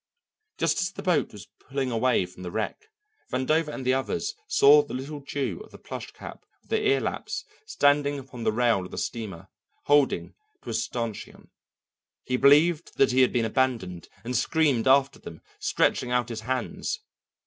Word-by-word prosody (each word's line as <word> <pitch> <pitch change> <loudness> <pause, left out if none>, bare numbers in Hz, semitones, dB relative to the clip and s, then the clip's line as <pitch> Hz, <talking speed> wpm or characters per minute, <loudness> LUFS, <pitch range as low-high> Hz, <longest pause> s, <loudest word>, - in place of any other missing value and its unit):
Just - - +1
as 185 0 -1
the - - -8
boat 180 -5 +1
was 105 -5 -11
pulling 135 -1 -3
away 115 -3 +2
from 90 +1 -14
the 90 - -5
wreck, 110 - -4 0.4
Vandover 155 +5 +1
and 140 -3 -6
the 130 - +3
others 210 - -1
saw 435 0 +7
the - - -7
little 140 +3 -5
Jew 140 -1 -3
of - - -17
the - - -13
plush - - -7
cap - - -11 0.2
with - - -27
the 445 - +2
ear 410 0 +4
laps - - -4 0.2
standing 145 - +2
upon 130 -3 -8
the 110 - +2
rail 115 -4 +2
of 90 - -8
the - - -8
steamer, 95 -6 -5 0.3
holding 145 -1 +2 0.3
to - - -6
a - - -3
stanchion. 115 -4 -4 0.7
He 125 - -1
believed 150 +5 +4
that 135 - +4
he 130 +1 +4
had 130 - +4
been 120 -2 +1
abandoned, 110 -8 -1
and 125 +2 -3
screamed 140 -1 +2
after 135 +1 +4
them, 80 -2 -10 0.2
stretching 125 - +1
out 125 -1 0
his 115 -2 -5
hands. 125 +2 -3
130 Hz, 180 wpm, -26 LUFS, 115-145 Hz, 0.7 s, saw